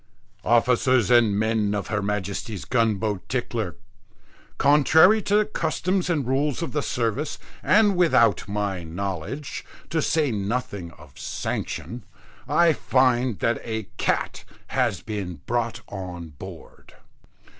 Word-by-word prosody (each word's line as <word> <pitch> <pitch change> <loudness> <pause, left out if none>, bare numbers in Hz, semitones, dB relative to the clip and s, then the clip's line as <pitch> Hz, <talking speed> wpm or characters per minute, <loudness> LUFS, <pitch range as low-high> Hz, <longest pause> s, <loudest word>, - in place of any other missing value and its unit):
"Officers 120 0 +3
and 115 -4 +5
men 110 -1 +1
of 100 - -3
Her 105 -2 0
Majesty's 100 +1 -3
gunboat 110 -4 0
Tickler, 115 - -2 0.8
contrary 160 +9 +5
to 205 - +1
the 215 0 +4
customs 180 -1 -1
and 150 -6 0
rules 140 +4 0
of 165 - -4
the 150 - -1
service, 125 +4 -2 0.2
and 205 -1 +4
without 165 -10 +3
my 100 -3 -2
knowledge, 100 - -5 0.3
to 160 -1 +1
say 150 -3 +1
nothing 100 -3 -3
of 75 -3 -16
sanction, 120 -1 -4 0.5
I 170 -2 +5
find 130 -5 +2
that 115 -1 +1
a 110 -4 -4
cat - - -1 0.3
has - - 0
been 95 -8 -5
brought 120 -1 -1
on 90 -4 -7
board. 70 -2 -12
115 Hz, 125 wpm, -24 LUFS, 100-145 Hz, 0.8 s, and